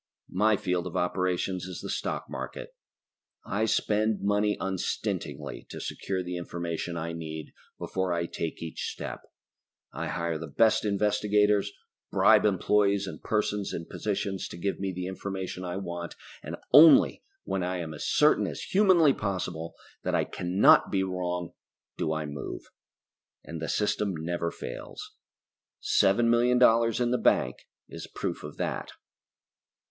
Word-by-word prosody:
My 105 +3 +3
field 90 -1 -1
of 85 - -4
operations 90 0 -1
is 90 - -7
the - - -6
stock - - -2
market. - - -7 0.7
I 105 +3 0
spend 110 -1 +1
money 105 +1 +2
unstintingly 95 -1 -3
to - - -7
secure 95 -1 -3
the 90 0 -4
information 85 0 -4
I 85 +1 -3
need 80 -1 -7 0.2
before 95 -1 -2
I 85 0 0
take 85 -1 -5
each 80 - -4
step. - - -6 0.7
I - - -4
hire 85 -2 -2
the 80 - -6
best 110 +9 +3
investigators, 105 0 +2 0.4
bribe - - +5
employees 100 0 +2
and 95 - -8
persons 105 -2 -1
in 85 - -4
position 100 -1 -3
to - - -6
give 100 +3 -2
me 95 0 -2
the 90 0 -4
information 95 0 -5
I 90 0 -4
want, 85 -2 -5 0.3
and - - -6 0.2
only 155 +2 +8 0.2
when 95 - -2
I 90 +1 -1
am 80 -3 -5
as 75 - -5
certain - - +4
as - - -5
humanly 185 -7 +5
possible 90 -6 -4 0.3
that - - -1
I - - +3
cannot 90 +3 +4
be 95 -1 +2
wrong 90 -2 -3 0.5
do 75 - -1
I 80 -1 -2
move. 70 -2 -7 0.7
And 85 -1 -7
the 80 - -3
system 105 -2 0
never 85 +1 -2
fails. 420 - -8 0.7
Seven 415 - +3
million 120 +1 +4
dollars 115 -2 +4
in 120 -1 +1
the 125 - +1
bank 65 - +2 0.3
is - - -8
proof - - -4
of - - -8
that. - - -3
95 Hz, 150 wpm, -28 LUFS, 85-105 Hz, 0.7 s, only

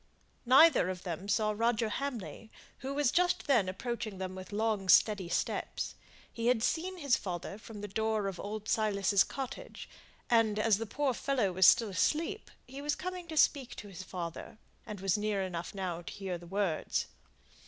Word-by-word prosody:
Neither 270 - +7
of 185 -1 -5
them 180 +1 -5
saw 215 +1 +2
Roger 230 0 +1
Hamley, 225 - -5 0.3
who 275 +1 -4
was 285 -3 +2
just 360 0 +2
then 235 -10 +3
approaching 225 +1 -4
them 185 0 -4
with 185 +1 -9
long, 210 -2 -1
steady 195 -1 +5
steps. 175 - -2 0.4
He 230 0 -2
had 245 -3 +3
seen 365 +6 -1
his 280 -7 +2
father 185 +2 -5
from 215 -1 -10
the 205 - -4
door 220 +1 -1
of 195 -2 -5
old 215 +1 -5
Silas's 200 -3 +3
cottage, 275 - -7 0.4
and, 225 -3 +3
as 215 -1 +3
the 225 - -4
poor 275 +4 0
fellow 245 -6 0
was 185 0 +5
still 225 -3 +6
asleep, 320 - 0 0.2
he 270 +2 -9
was 295 0 0
coming 365 -1 -6
to 315 -1 -6
speak 275 -4 +3
to 205 - -9
his 185 -2 -8
father, 175 +1 -6 0.3
and 205 -3 -7
was 195 +1 +1
near 205 -2 0
enough 175 -1 -5
now 180 -3 -3
to 170 - -8
hear 190 -3 -4
the 175 - -12
next - - -16
words. 195 -6 0
215 Hz, 185 wpm, -32 LUFS, 190-255 Hz, 0.4 s, Neither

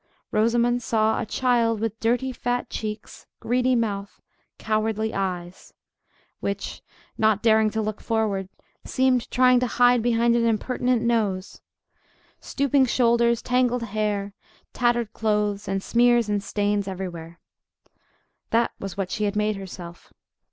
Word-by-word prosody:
Rosamond 235 +2 +2
saw 220 -1 +1
a 230 - -5
child 235 -2 +1
with 225 0 -3
dirty 245 +3 0
fat 245 0 -3
cheeks, 215 0 -6
greedy 250 +2 +1
mouth, 205 -4 -2 0.4
cowardly 220 0 -1
eyes—which, 185 +1 -6 0.4
not 215 -1 +2
daring 220 -1 +4
to 220 +1 -2
look 215 0 -4
forward, 210 -4 -1 0.3
seemed 255 -3 +1
trying 250 0 +4
to 250 - 0
hide 245 0 +4
behind 235 0 +2
an 235 - +2
impertinent 240 +2 0
nose—stooping 235 +5 -2
shoulders, 235 -1 +2
tangled 250 -1 +1
hair, 205 -2 -2 0.4
tattered 240 -2 0
clothes, 210 -2 -1
and 195 0 -2
smears 240 -1 +3
and 205 -1 0
stains 205 -1 -1
everywhere. 175 -3 -6 1.1
That 230 +1 +2
was 195 -1 -6
what 195 -2 -3
she 210 - -1
had 205 0 -1
made 210 0 +1
herself. 175 -3 -10
220 Hz, 125 wpm, -24 LUFS, 205-240 Hz, 1.1 s, daring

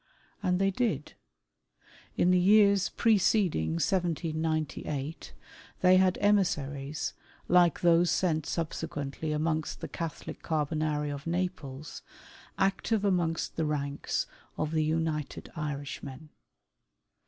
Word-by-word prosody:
And 180 -2 +1
they 195 +1 +2
did. 185 - -1 1.0
In 180 - +4
the 180 - +5
years 200 0 +5
preceding 190 - +2
1798, 155 - -2 0.5
they 185 0 +6
had 185 -1 +3
emissaries, 150 -8 0 0.3
like 175 -3 +4
those 170 0 +4
sent 160 -3 +1
subsequently 155 -2 -3
amongst 155 +1 -1
the - - -5
Catholic 165 -3 -6
Carbonari 150 -1 -1
of 140 +2 -7
Naples, 160 -5 -4 0.6
active 200 +2 +1
amongst 175 -4 0
the 160 - +1
ranks 140 -1 -2 0.3
of 155 0 -1
the 155 -1 +1
United 155 -2 -2
Irishmen. 145 -1 -5
160 Hz, 100 wpm, -29 LUFS, 150-180 Hz, 1.0 s, they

